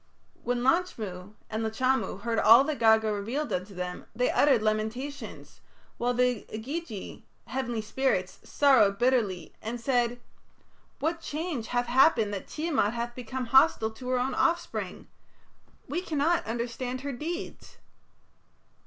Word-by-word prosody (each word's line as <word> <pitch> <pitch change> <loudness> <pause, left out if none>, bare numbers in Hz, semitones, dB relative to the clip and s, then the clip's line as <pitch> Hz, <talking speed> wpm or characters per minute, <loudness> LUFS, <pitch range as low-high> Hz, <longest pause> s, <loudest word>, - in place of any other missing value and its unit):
When 245 0 -1
Lachmu 215 - -1
and 220 +1 -3
Lachamu 225 -2 0
heard 230 0 0
all 230 +5 +8
that 300 0 -3
Gaga 220 -1 +4
revealed 235 +9 -3
unto 185 +2 -4
them 180 0 -5
they 250 +2 +1
uttered 265 -7 +4
lamentations, 220 +6 -3 0.4
while 245 +1 0
the 250 -2 +1
Igigi 230 - -6 0.2
(heavenly 240 -3 -3
spirits) 210 -6 -1
sorrowed 230 -9 +4
bitterly, 215 -9 +1
and 235 +2 -4
said: 245 -1 +1 0.8
"What 330 +2 -2
change 300 -7 -4
hath 245 0 0
happened 240 -4 +4
that 195 - -5
Tiamat 300 -9 0
hath 235 0 -3
become 255 +1 -5
hostile 265 -5 +5
to 250 +3 -8
her 255 - +2
own 255 +1 -1
offspring? 340 0 -1 0.8
We 350 - -2
cannot 325 -2 0
understand 240 +2 -3
her 280 0 -4
deeds." 335 +9 -6
245 Hz, 130 wpm, -28 LUFS, 220-270 Hz, 0.8 s, all